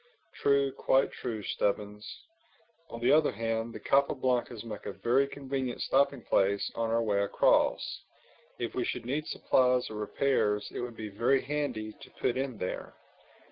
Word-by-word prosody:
"True, 140 Hz, -1 st, +2 dB
quite 135 Hz, 0 st, +2 dB
true, 110 Hz, -4 st, -5 dB
Stubbins. 105 Hz, +1 st, -2 dB, 0.7 s
On 115 Hz, -, -7 dB
the 120 Hz, +2 st, +3 dB
other 155 Hz, 0 st, +5 dB
hand, 115 Hz, +1 st, -2 dB
the 115 Hz, -, -8 dB
Capa 140 Hz, +1 st, +2 dB
Blancas 125 Hz, -3 st, -1 dB
make 110 Hz, -3 st, -7 dB
a -, -, -4 dB
very 130 Hz, +6 st, +2 dB
convenient 135 Hz, -3 st, -4 dB
stopping 140 Hz, -2 st, +2 dB
place 100 Hz, +1 st, +1 dB
on 115 Hz, -1 st, -1 dB
our 115 Hz, +1 st, +2 dB
way 100 Hz, -2 st, +1 dB
across. 100 Hz, -, +2 dB, 0.6 s
If 120 Hz, -, -3 dB
we 125 Hz, -, -1 dB
should -, -, -3 dB
need 145 Hz, +5 st, -2 dB
supplies 125 Hz, -2 st, +2 dB
or 110 Hz, -, -6 dB
repairs 105 Hz, -1 st, 0 dB
it -, -, -4 dB
would 120 Hz, -1 st, -5 dB
be 110 Hz, -1 st, -5 dB
very 120 Hz, +7 st, +2 dB
handy 130 Hz, -7 st, -3 dB
to -, -, -11 dB
put 120 Hz, -, +1 dB
in 130 Hz, -3 st, -2 dB
there." 90 Hz, -, -5 dB
120 Hz, 165 wpm, -30 LUFS, 110-135 Hz, 0.7 s, other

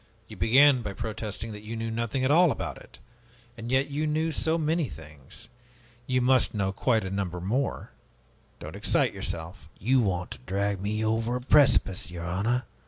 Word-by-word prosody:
You 110 Hz, -, -10 dB
began 130 Hz, +7 st, +5 dB
by 105 Hz, -3 st, -5 dB
protesting 110 Hz, +1 st, -5 dB
that 105 Hz, -1 st, -8 dB
you 110 Hz, +2 st, -6 dB
knew 115 Hz, 0 st, -3 dB
nothing 115 Hz, +3 st, -2 dB
at 130 Hz, -, +2 dB
all 175 Hz, +3 st, +6 dB
about 80 Hz, -, -5 dB
it. -, -, -16 dB, 0.6 s
And 115 Hz, +1 st, -7 dB
yet 135 Hz, +2 st, +1 dB
you 150 Hz, +2 st, -1 dB
knew 155 Hz, +2 st, 0 dB
so 160 Hz, +2 st, 0 dB
many 160 Hz, -2 st, 0 dB
things. 75 Hz, -4 st, -11 dB, 0.6 s
You 130 Hz, 0 st, +1 dB
must 125 Hz, -2 st, +3 dB
know 100 Hz, -2 st, 0 dB
quite 110 Hz, +3 st, +1 dB
a 95 Hz, -, -5 dB
number 95 Hz, -3 st, -3 dB
more. 120 Hz, +10 st, -2 dB, 0.7 s
Don't -, -, -8 dB
excite -, -, +1 dB
yourself." 85 Hz, +5 st, -6 dB
"You 130 Hz, +7 st, +2 dB
want 90 Hz, -6 st, -1 dB
to -, -, -8 dB
drag 100 Hz, 0 st, -1 dB
me 105 Hz, +2 st, -1 dB
over 115 Hz, +2 st, 0 dB
a 125 Hz, -, -3 dB
precipice, 130 Hz, -10 st, +3 dB
your 85 Hz, -1 st, -7 dB
honor! 105 Hz, +8 st, 0 dB
115 Hz, 180 wpm, -27 LUFS, 95-130 Hz, 0.7 s, all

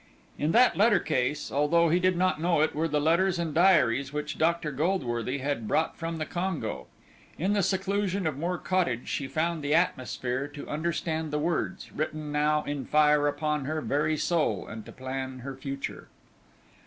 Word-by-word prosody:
In 150 Hz, +2 st, +1 dB
that 245 Hz, +2 st, +5 dB
letter 210 Hz, +1 st, +5 dB
case, 145 Hz, -2 st, -1 dB
although 165 Hz, +4 st, +3 dB
he 175 Hz, +3 st, +3 dB
did 185 Hz, -1 st, +2 dB
not 185 Hz, -3 st, +1 dB
know 170 Hz, -2 st, +2 dB
it, 155 Hz, -, +2 dB
were 160 Hz, +2 st, 0 dB
the 150 Hz, -1 st, 0 dB
letters 170 Hz, +5 st, +2 dB
and 170 Hz, -3 st, -2 dB
diaries 140 Hz, -7 st, +4 dB
which 150 Hz, +1 st, -4 dB
Dr. 165 Hz, -1 st, +1 dB
Goldworthy 135 Hz, -, -1 dB
had 135 Hz, -5 st, -2 dB
brought 160 Hz, -, +1 dB
from 165 Hz, -1 st, -4 dB
the 155 Hz, -, -2 dB
Congo. 180 Hz, 0 st, -3 dB, 0.5 s
In 190 Hz, +6 st, +1 dB
the 205 Hz, -, +2 dB
seclusion 195 Hz, 0 st, 0 dB
of 155 Hz, -3 st, 0 dB
Moor 175 Hz, +5 st, -2 dB
Cottage 170 Hz, -13 st, -1 dB
she 140 Hz, -, -2 dB
found 160 Hz, +3 st, -1 dB
the 145 Hz, +2 st, +2 dB
atmosphere 130 Hz, -5 st, 0 dB
to 145 Hz, 0 st, -9 dB
understand 160 Hz, 0 st, -2 dB
the 150 Hz, -, -1 dB
words, 165 Hz, +2 st, -2 dB
written 155 Hz, -1 st, -4 dB
now 150 Hz, +1 st, +2 dB
in 145 Hz, -2 st, -3 dB
fire 150 Hz, -1 st, +4 dB
upon 150 Hz, -1 st, -1 dB
her 155 Hz, +2 st, -2 dB
very 155 Hz, +1 st, 0 dB
soul, 150 Hz, -, 0 dB
and 110 Hz, 0 st, -8 dB
to -, -, -9 dB
plan 130 Hz, 0 st, -5 dB
her 135 Hz, +1 st, -6 dB
future. 135 Hz, +1 st, -6 dB
155 Hz, 180 wpm, -28 LUFS, 145-170 Hz, 0.5 s, that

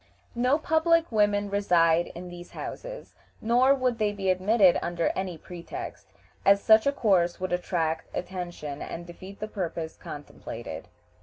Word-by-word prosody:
No 250 Hz, +4 st, +2 dB
public 325 Hz, +1 st, +2 dB
women 205 Hz, -2 st, +2 dB
reside 175 Hz, -4 st, +3 dB
in 175 Hz, +1 st, -7 dB
these 175 Hz, 0 st, -10 dB
houses, -, -, -7 dB, 0.3 s
nor 250 Hz, +4 st, +4 dB
would 250 Hz, -3 st, 0 dB
they 210 Hz, -1 st, +2 dB
be 195 Hz, -2 st, 0 dB
admitted 190 Hz, 0 st, +4 dB
under 170 Hz, -1 st, 0 dB
any 185 Hz, -3 st, -3 dB
pretext, 175 Hz, +1 st, -8 dB, 0.4 s
as 200 Hz, 0 st, +6 dB
such 220 Hz, +4 st, +5 dB
a -, -, +5 dB
course 190 Hz, -10 st, +2 dB
would 185 Hz, -1 st, -2 dB
attract 165 Hz, -2 st, -1 dB
attention 175 Hz, -6 st, -5 dB
and 170 Hz, +1 st, -6 dB
defeat 185 Hz, +3 st, -11 dB
the 215 Hz, -, -4 dB
purposes 170 Hz, -6 st, -4 dB
contemplated. 145 Hz, 0 st, -8 dB
190 Hz, 145 wpm, -27 LUFS, 175-225 Hz, 0.4 s, as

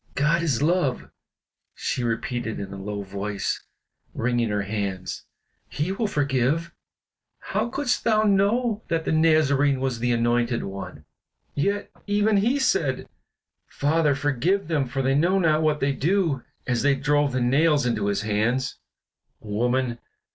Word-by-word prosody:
"God 150 Hz, +4 st, +2 dB
is 145 Hz, -5 st, 0 dB
love," 155 Hz, -6 st, 0 dB, 0.6 s
she 125 Hz, -, -2 dB
repeated 115 Hz, 0 st, -2 dB
in 100 Hz, -1 st, -6 dB
a 100 Hz, -, -7 dB
low 100 Hz, 0 st, -4 dB
voice, 100 Hz, +1 st, -3 dB, 0.5 s
wringing 120 Hz, -1 st, 0 dB
her 105 Hz, -1 st, -1 dB
hands; 100 Hz, -2 st, -4 dB, 0.4 s
"He 150 Hz, +8 st, -2 dB
will 215 Hz, +3 st, -1 dB
forgive. 145 Hz, +1 st, 0 dB, 0.7 s
How -, -, -2 dB
couldst 270 Hz, 0 st, -1 dB
thou 215 Hz, -2 st, +3 dB
know 215 Hz, +3 st, +2 dB
that 165 Hz, -1 st, -1 dB
the -, -, 0 dB
Nazarene 150 Hz, -4 st, +3 dB
was 130 Hz, -3 st, -2 dB
the 120 Hz, +1 st, 0 dB
Anointed 120 Hz, 0 st, +1 dB
One? 95 Hz, 0 st, -7 dB, 0.5 s
Yet, 200 Hz, +8 st, -1 dB, 0.2 s
even 205 Hz, +1 st, +2 dB
he 235 Hz, +8 st, +2 dB
said, 165 Hz, -, 0 dB, 0.6 s
'Father, 150 Hz, 0 st, +1 dB
forgive 145 Hz, +7 st, 0 dB
them, 145 Hz, -5 st, +1 dB
for 135 Hz, +2 st, -2 dB
they 135 Hz, +1 st, +2 dB
know 175 Hz, +7 st, +3 dB
not 160 Hz, -4 st, +3 dB
what 155 Hz, -1 st, +1 dB
they 140 Hz, +1 st, +2 dB
do!' 160 Hz, -1 st, +1 dB, 0.2 s
as 120 Hz, -2 st, 0 dB
they 140 Hz, 0 st, +3 dB
drove 145 Hz, +1 st, +1 dB
the 130 Hz, -, -1 dB
nails 140 Hz, +3 st, +3 dB
into 110 Hz, -4 st, 0 dB
his 100 Hz, +1 st, 0 dB
hands." 115 Hz, +5 st, 0 dB, 0.6 s
"Woman!" 120 Hz, +3 st, -1 dB
140 Hz, 145 wpm, -24 LUFS, 120-165 Hz, 0.7 s, thou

